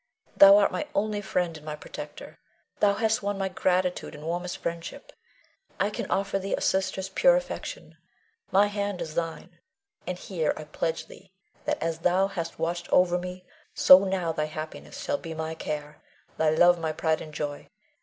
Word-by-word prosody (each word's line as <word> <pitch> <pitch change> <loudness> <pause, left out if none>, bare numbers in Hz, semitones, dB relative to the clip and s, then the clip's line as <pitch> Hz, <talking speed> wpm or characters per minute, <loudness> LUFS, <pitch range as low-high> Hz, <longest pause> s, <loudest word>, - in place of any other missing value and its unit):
Thou 195 0 +9
art 205 - +4
my 300 - -3
only 210 0 0
friend 180 -4 -1
and 155 - -11
my 150 -1 -5
protector; 150 0 -9 0.4
thou 200 -1 +4
hast 220 +1 +1
won 200 0 -2
my 195 -1 -1
gratitude 180 -1 0
and 150 - -10
warmest 175 +2 -3
friendship. 170 - -6 0.7
I 200 +2 +1
can - - -5
offer 195 0 0
thee 195 +1 -1
a - - -6
sister's 190 0 0
pure - - +5
affection, - - -5 0.5
my 200 +2 +5
hand 205 -2 -2
is 155 - -5
thine; 165 0 -4 0.5
and 180 0 -3
here 170 -5 -1
I 155 - -6
pledge 160 +2 -3
thee 190 -1 -16 0.3
that - - 0
as 165 -1 -2
thou 180 +3 +3
hast 170 -4 -5
watched 170 +1 -3
o'er 180 0 +4
me, 180 0 -7 0.3
so 185 - +9
now 190 -3 -1
thy 155 -1 -1
happiness 155 - -7
shall 285 -1 -1
be 165 -2 -7
my 160 0 -3
care, 150 -2 -5 0.3
thy 160 -1 +2
love 175 +3 +5
my 160 -1 -1
pride 160 0 0
and 155 - -8
joy. 145 -1 -5
180 Hz, 180 wpm, -27 LUFS, 160-195 Hz, 0.7 s, Thou